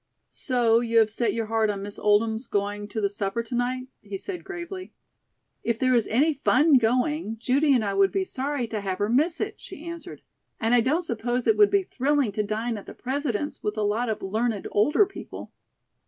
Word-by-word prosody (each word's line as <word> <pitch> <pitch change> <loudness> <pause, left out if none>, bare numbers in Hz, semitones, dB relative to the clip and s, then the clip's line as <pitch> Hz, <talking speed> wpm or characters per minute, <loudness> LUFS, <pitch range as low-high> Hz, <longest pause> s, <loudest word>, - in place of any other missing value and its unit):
"So 240 -3 +2
you 230 -1 0
have 220 -1 +5
set 235 +2 0
your 230 -1 -1
heart 220 0 +1
on 200 -1 -3
Miss 205 0 -7
Oldham's 220 +3 +2
going 205 +1 -2
to 210 +2 -4
the 200 - +3
supper 205 +3 -2
to 230 - -9
night?" 250 +1 -1 0.2
he 200 -1 -6
said 365 - -6
gravely. 370 0 -7 0.7
"If 235 -1 0
there 255 +1 +2
is 235 -3 +2
any 290 +8 +3
fun 280 +1 +4
going, 245 +1 0
Judy 270 +5 +3
and 230 -4 +1
I 200 - -1
would 195 0 +3
be 390 - 0
sorry 280 -5 -2
to 215 -2 -3
have 190 -2 -2
her 205 - 0
miss 310 +8 +2
it," - - -4
she 360 -4 -10
answered. 335 0 -8 0.4
"And 225 +1 +1
I 245 - +6
don't 300 +9 +1
suppose 240 -2 -2
it 440 - +4
would 415 -1 +6
be 400 -1 +2
thrilling 280 - 0
to 210 - -1
dine 215 +2 -2
at - - -14
the - - -9
President's 275 0 -3
with 210 +1 -3
a 215 - 0
lot 220 +4 0
of 220 - -3
learned 215 +2 -1
older 290 - +4
people." 390 - -9
235 Hz, 215 wpm, -25 LUFS, 215-285 Hz, 0.7 s, I